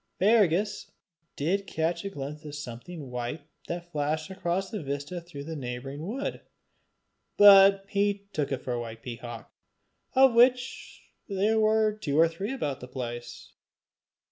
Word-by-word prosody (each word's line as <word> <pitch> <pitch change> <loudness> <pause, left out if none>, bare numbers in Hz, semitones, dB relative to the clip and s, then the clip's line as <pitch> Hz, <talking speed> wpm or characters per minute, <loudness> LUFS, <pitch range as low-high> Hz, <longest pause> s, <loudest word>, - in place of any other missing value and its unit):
Fergus 205 -1 +2 0.5
did 195 +7 -1
catch 165 +2 -1
a 200 - -3
glimpse 150 -2 -7
of 150 -1 -7
something 140 +2 -8
white 125 +5 -4 0.2
that 175 0 -5
flashed 155 +3 -2
across 190 +2 -2
a 215 - -3
vista 145 +5 -4
through 165 -4 -9
the 160 +2 -6
neighbouring 135 +1 -6
wood, 265 +7 -4 1.0
but 195 -1 +8
he 200 0 0
took 145 -2 -1
it 135 - -3
for 125 - -2
a 120 - -2
white 115 -1 -8
peacock, 120 -1 -8 0.6
of 265 -1 +6
which 245 +1 +2 0.3
there 205 +3 +2
were 215 0 +3
two 150 -9 -2
or 165 - +7
three 180 +8 -5
about 145 - -3
the 125 - -9
place. 120 -2 -7
165 Hz, 145 wpm, -28 LUFS, 140-200 Hz, 1.0 s, but